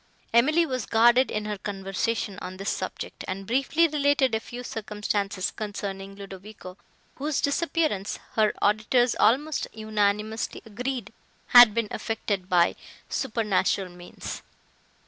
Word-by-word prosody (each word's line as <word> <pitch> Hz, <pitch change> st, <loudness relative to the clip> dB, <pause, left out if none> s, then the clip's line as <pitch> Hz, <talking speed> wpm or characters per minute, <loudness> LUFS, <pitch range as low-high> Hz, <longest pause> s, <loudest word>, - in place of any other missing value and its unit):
Emily 305 Hz, +9 st, +4 dB
was 255 Hz, -6 st, -3 dB
guarded 240 Hz, +3 st, +5 dB
in 215 Hz, 0 st, -2 dB
her 210 Hz, -2 st, -4 dB
conversation 195 Hz, +1 st, -2 dB
on 185 Hz, +1 st, -7 dB
this 195 Hz, +2 st, -2 dB
subject, -, -, -5 dB
and 195 Hz, +1 st, -4 dB
briefly 275 Hz, -, +2 dB
related 285 Hz, -4 st, +2 dB
a 220 Hz, -, +2 dB
few 245 Hz, +2 st, -8 dB
circumstances 210 Hz, -4 st, -2 dB
concerning 195 Hz, -2 st, -5 dB
Ludovico, 195 Hz, -1 st, -10 dB, 0.4 s
whose 290 Hz, +1 st, -1 dB
disappearance, 300 Hz, -, 0 dB, 0.2 s
her 215 Hz, -1 st, +3 dB
auditors 215 Hz, +4 st, +3 dB
almost 280 Hz, +8 st, +2 dB
unanimously 215 Hz, 0 st, -1 dB
agreed, 240 Hz, 0 st, -4 dB, 0.4 s
had 240 Hz, -3 st, +9 dB
been 230 Hz, -2 st, +1 dB
effected 205 Hz, -4 st, -3 dB
by 175 Hz, -1 st, +4 dB, 0.3 s
supernatural 210 Hz, -6 st, 0 dB
means. 175 Hz, 0 st, -8 dB
215 Hz, 120 wpm, -26 LUFS, 195-250 Hz, 0.4 s, had